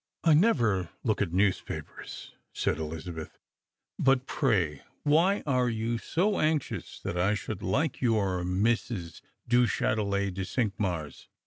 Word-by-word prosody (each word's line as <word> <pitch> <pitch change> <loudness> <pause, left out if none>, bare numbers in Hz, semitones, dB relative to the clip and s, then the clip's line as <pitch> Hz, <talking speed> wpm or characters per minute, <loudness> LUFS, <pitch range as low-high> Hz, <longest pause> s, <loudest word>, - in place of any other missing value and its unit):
" - - -58
I 165 - +6
never 120 - +3
look 110 -4 +1
at 95 -5 0
newspapers," 95 +1 -2 0.2
said - - 0
Elizabeth; 80 +1 -6 0.3
" - - -51
but 135 -1 +3
pray 95 - +1 0.2
why 170 +7 +3
are 125 -4 +2
you 115 +1 -1
so 195 - 0
anxious 155 -2 -1
that 90 - -3
I 100 +4 +3
should 105 -1 -5
like 140 - 0
your 100 -7 +1
Mrs. 95 -1 -1 0.3
du 120 0 +4
Chtitelet 100 -4 0
de 95 - -4
Cinqmars? 95 - -2
110 Hz, 135 wpm, -29 LUFS, 90-130 Hz, 0.3 s, I